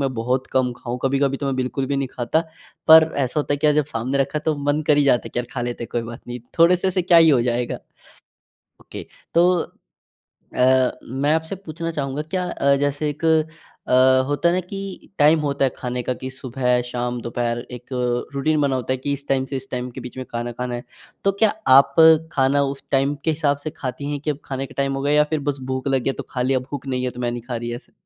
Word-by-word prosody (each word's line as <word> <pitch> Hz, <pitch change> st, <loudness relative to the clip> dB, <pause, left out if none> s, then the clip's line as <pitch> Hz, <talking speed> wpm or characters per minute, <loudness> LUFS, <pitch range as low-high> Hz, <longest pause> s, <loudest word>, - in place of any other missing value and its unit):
मैं 130 Hz, -, -3 dB
बहुत 125 Hz, +3 st, -1 dB
कम 125 Hz, -1 st, +2 dB
खाऊँ। 125 Hz, 0 st, -5 dB
कभी-कभी 135 Hz, 0 st, +1 dB
तो 140 Hz, -, -4 dB
मैं 135 Hz, -, 0 dB
बिल्कुल 130 Hz, +1 st, -2 dB
भी 140 Hz, 0 st, -1 dB
नहीं 135 Hz, -2 st, -1 dB
खाता 125 Hz, +6 st, 0 dB, 0.5 s
पर 160 Hz, 0 st, +9 dB
ऐसा 135 Hz, +1 st, 0 dB
होता 145 Hz, -, -2 dB
है -, -, +1 dB
कि 155 Hz, -, +1 dB
यार 150 Hz, -, +4 dB
जब 150 Hz, -2 st, +2 dB
सामने 130 Hz, +1 st, -2 dB
रखा 140 Hz, +2 st, 0 dB
है 150 Hz, -, -10 dB
तो 155 Hz, -1 st, +1 dB, 0.2 s
मन 150 Hz, -, -1 dB
कर 150 Hz, -, +4 dB
ही 145 Hz, -, +4 dB
जाता 125 Hz, -3 st, +4 dB
है -, -, -8 dB
कि -, -, -3 dB
यार 120 Hz, -, -2 dB
खा 125 Hz, -, -3 dB
लेते 120 Hz, -1 st, -4 dB
हैं -, -, -11 dB
कोई 120 Hz, -, 0 dB
बात 115 Hz, +2 st, -8 dB
नहीं, 120 Hz, 0 st, -6 dB, 0.2 s
थोड़े-से 180 Hz, +3 st, +4 dB
से 185 Hz, -1 st, 0 dB
क्या 175 Hz, -1 st, +4 dB
ही 165 Hz, -1 st, +7 dB
हो 130 Hz, -4 st, +4 dB
जाएगा। 120 Hz, 0 st, -1 dB, 1.0 s
ओके -, -, -9 dB, 0.3 s
तो 175 Hz, +2 st, +5 dB, 1.0 s
अ, 130 Hz, 0 st, +4 dB
मैं 135 Hz, +5 st, -1 dB
आपसे 160 Hz, +4 st, -2 dB
पूछना 165 Hz, -2 st, -5 dB
चाहूँगा 140 Hz, 0 st, -3 dB
क्या 180 Hz, +4 st, -3 dB
अ, 140 Hz, -3 st, +2 dB
जैसे 145 Hz, +1 st, 0 dB
एक 150 Hz, +3 st, -8 dB, 0.6 s
अ, 130 Hz, +1 st, +5 dB
होता 145 Hz, +4 st, +1 dB
है 175 Hz, -, +2 dB
ना 185 Hz, -, +1 dB
कि 195 Hz, +1 st, -8 dB
टाइम 150 Hz, +2 st, +5 dB
होता 140 Hz, -2 st, 0 dB
है 130 Hz, -, +2 dB
खाने 125 Hz, 0 st, -3 dB
का 125 Hz, -, -2 dB
कि 130 Hz, 0 st, -5 dB
सुबह, 125 Hz, -1 st, -1 dB
शाम, 120 Hz, 0 st, -3 dB
दोपहर 120 Hz, 0 st, -2 dB
एक 125 Hz, 0 st, -8 dB, 0.5 s
रूटीन 150 Hz, +2 st, +1 dB
बना 140 Hz, -2 st, +1 dB
होता 130 Hz, 0 st, -2 dB
है -, -, 0 dB
कि 140 Hz, +2 st, -2 dB
इस 140 Hz, 0 st, -6 dB
टाइम 135 Hz, -1 st, +1 dB
से 135 Hz, -, -2 dB
इस 135 Hz, +1 st, -7 dB
टाइम 125 Hz, 0 st, -3 dB
के -, -, -9 dB
बीच 125 Hz, -, -9 dB
में 130 Hz, -, -5 dB
खाना 120 Hz, 0 st, -3 dB
खाना 125 Hz, +1 st, -4 dB
है। 120 Hz, -, -5 dB, 0.4 s
तो 195 Hz, -, +3 dB
क्या 220 Hz, -, +6 dB, 0.3 s
आप 140 Hz, -, +5 dB, 0.4 s
खाना 140 Hz, +1 st, +2 dB
उस 135 Hz, 0 st, -4 dB
टाइम 135 Hz, +2 st, +2 dB
के 160 Hz, -, +2 dB
हिसाब 145 Hz, -2 st, +1 dB
से 155 Hz, -, -2 dB
खाती 140 Hz, +2 st, -4 dB
हैं 145 Hz, -, -3 dB
कि 150 Hz, +1 st, -2 dB
अब 140 Hz, -, -3 dB
खाने 135 Hz, 0 st, -4 dB
का -, -, -15 dB
टाइम 140 Hz, 0 st, 0 dB
हो 135 Hz, -, -3 dB
गया? 145 Hz, +1 st, +1 dB
या 150 Hz, 0 st, +5 dB
फिर 155 Hz, -2 st, 0 dB
बस 140 Hz, -, -6 dB
भूख 130 Hz, +1 st, -2 dB
लग 135 Hz, -2 st, +1 dB
गया 135 Hz, -, 0 dB
तो -, -, -2 dB
खा 125 Hz, -, -2 dB
लिया, 130 Hz, +1 st, +2 dB
भूख 140 Hz, +2 st, -7 dB
नहीं 130 Hz, -1 st, -2 dB
है 125 Hz, -, -1 dB
तो 125 Hz, -, -9 dB
मैं 120 Hz, -1 st, 0 dB
नहीं 120 Hz, -1 st, -5 dB
खा 120 Hz, -, -2 dB
रही, 120 Hz, 0 st, -4 dB
ऐसा? 120 Hz, -, -11 dB
135 Hz, 255 wpm, -22 LUFS, 125-150 Hz, 1.0 s, पर